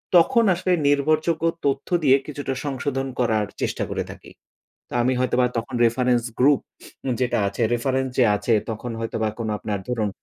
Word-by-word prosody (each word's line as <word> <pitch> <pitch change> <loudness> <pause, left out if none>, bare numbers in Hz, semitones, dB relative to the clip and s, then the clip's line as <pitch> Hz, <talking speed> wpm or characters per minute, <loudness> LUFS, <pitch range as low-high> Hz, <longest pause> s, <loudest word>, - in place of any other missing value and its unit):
তখন 230 +8 +5
আসলে 185 +1 -1 0.2
নির্ভরযোগ্য 155 +3 +2 0.2
তথ্য 140 -1 0 0.2
দিয়ে 135 -2 +6
কিছুটা 145 -2 -4
সংশোধন 135 -1 -2
করার 110 -4 +2 0.2
চেষ্টা - - -1
করে - - -2
থাকি। - - -13 0.6
তো - - -18
আমি 125 +2 +2
হয়তোবা 125 0 +2
তখন 120 +3 -5
রেফারেন্স 120 +1 +2 0.2
গ্রুপ 140 +2 +5 0.6
যেটা 125 - +1
আছে 100 +4 -4
রেফারেন্স 130 +2 0
যে 125 - +6
আছে 105 +3 -1 0.2
তখন 115 +2 -5
হয়তোবা 115 -1 -2 0.3
আপনার 105 -2 -3
ধরুন। 115 -4 0
130 Hz, 155 wpm, -23 LUFS, 120-145 Hz, 0.6 s, দিয়ে